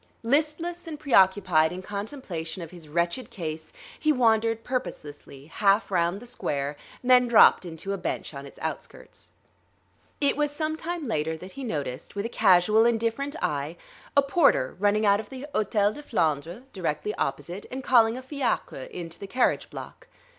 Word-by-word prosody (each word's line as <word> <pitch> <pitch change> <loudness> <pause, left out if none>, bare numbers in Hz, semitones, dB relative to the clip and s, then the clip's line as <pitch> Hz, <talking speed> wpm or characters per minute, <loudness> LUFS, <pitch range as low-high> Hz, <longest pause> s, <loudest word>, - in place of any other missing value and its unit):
Listless 310 +7 0
and 305 -2 -6
preoccupied 190 - +4
in 185 +1 -6
contemplation 200 - -5
of 165 - -10
his 170 -4 -12
wretched 170 - -1
case 160 -3 -6 0.3
he 310 - +3
wandered 225 -3 +2
purposelessly 145 - -5
half 200 +6 +2
round 175 +1 +1
the 245 - -12
square, 145 - -3 0.3
then 250 0 +5
dropped 230 -4 +6
into 170 +4 -5
a 195 - -4
bench - - -4
on 140 0 -8
its - - -15
outskirts. - - -7 0.9
It 285 -1 +2
was 295 0 +1
some 310 +2 -2
time 330 -2 -4
later 160 -5 -1
that 185 +4 -10
he 275 - -8
noticed, 145 - -4
with 200 +1 -2
a - - -2
casual, 195 +2 +5
indifferent 235 +5 0
eye, 150 +3 -2 0.4
a 280 - +7
porter 275 - +3
running 205 +2 +2
out 200 0 +4
of 215 - -7
the 265 +1 -7
Hôtel 210 0 +2
de 295 - -9
Flandre, 170 - -1
directly 175 +2 -2
opposite, 160 +8 -4
and 260 +1 -6
calling 235 -2 +4
a 260 - -7
fiacre 260 - -2
in 175 -2 -6
to 165 - -9
the 200 - -7
carriage 245 +5 +1
block. - - -10
205 Hz, 170 wpm, -26 LUFS, 165-255 Hz, 0.9 s, a